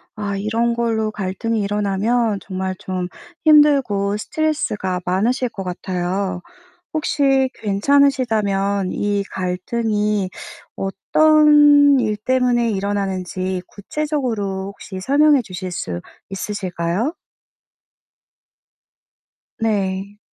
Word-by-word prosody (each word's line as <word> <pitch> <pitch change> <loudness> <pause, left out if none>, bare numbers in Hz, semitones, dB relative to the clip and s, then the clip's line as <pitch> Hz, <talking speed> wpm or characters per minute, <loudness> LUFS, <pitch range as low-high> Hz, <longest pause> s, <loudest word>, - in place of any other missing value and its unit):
아 205 -1 -3
이런 225 +4 0
걸로 225 -2 0
갈등이 210 +3 -2
일어나면 205 +2 0
정말 190 -1 -4
좀 185 -1 -3 0.4
힘들고 275 -10 +4
스트레스가 210 -9 -1
많으실 230 +8 +1
것 195 - -7
같아요. 180 +1 -3 0.5
혹시 275 -3 +2
괜찮으시다면 210 -4 +1
이 205 -1 0
갈등이 205 +2 -1 0.5
어떤 295 +6 +5
일 215 -3 0
때문에 245 +1 +1
일어나는지 190 -2 -2
구체적으로 220 -6 -3
혹시 195 -1 -8
설명해 285 +4 +4
주실 185 -3 -6
수 90 - -4 0.3
있으실까요? 195 - -2 2.5
네. 200 -2 -2
205 Hz, 210 characters per minute, -20 LUFS, 190-250 Hz, 2.5 s, 어떤